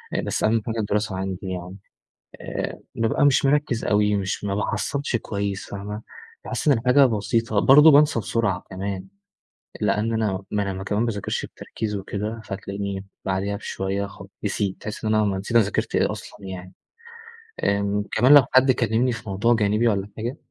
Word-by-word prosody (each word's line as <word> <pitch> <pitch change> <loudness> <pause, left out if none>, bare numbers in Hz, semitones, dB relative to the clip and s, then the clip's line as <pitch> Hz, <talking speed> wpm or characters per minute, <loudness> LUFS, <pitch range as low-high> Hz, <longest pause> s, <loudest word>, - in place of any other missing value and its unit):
آآ، - - +1
بس - - -2
أهم 110 +1 +3
حاجة 115 -1 -3
الدراسة 105 -2 -1
عندي 95 -1 -3
يعني، 90 +1 -6 0.6
آآ - - -4
بابقى 115 +4 +1
مش 140 -1 +3
مرَكَّز 135 -4 +1
أوي، 105 0 +2
مش 100 0 -3
ما 100 -1 -1
باحَصلش 125 +6 -1
كويس، 100 -3 -3
فاهمة؟ 105 +2 -6 0.4
باحس - - -2
إن 140 -5 +5
الحاجة 130 +4 +5
بسيطة، 115 -1 0
برضه 150 +7 +8
بَانْسَى 145 -4 +5
بسرعة 100 -2 -1
كمان، 95 0 -4 0.7
لأن 110 +2 +1
أنا 105 -4 -1
ما 100 -2 -1
أنا 95 0 -5
كمان 105 +2 -1
مَا - - +1
بَاذَاكِرْش 105 -4 -3
بتركيز 110 -2 -5
وكده، 105 +3 -4
فتلاقيني 100 0 -5 0.2
بعديها 95 +2 -1
بشوية 100 -1 -3
خ 100 - -12 0.2
نسيت، 100 -2 -1
تحس 110 +1 -6
إن 110 0 +2
أنا 110 0 +3
ما 100 -2 0
نسيت 100 +5 -2
انا 115 - +6
ذاكرت 105 - -2
إيه - - +2
أصلًا 100 - -10
يعني، 95 -1 -8 0.9
آمم 100 0 +1
كمان 125 +6 +5
لو 145 -3 +8
حد 130 +1 +6
كلمني 120 +1 +1
في 115 -3 -6
موضوع 105 +5 +2
جانبي 105 +1 +2
والّا 100 -2 0
حاجة، 120 +6 -4
105 Hz, 175 wpm, -23 LUFS, 100-115 Hz, 0.9 s, برضه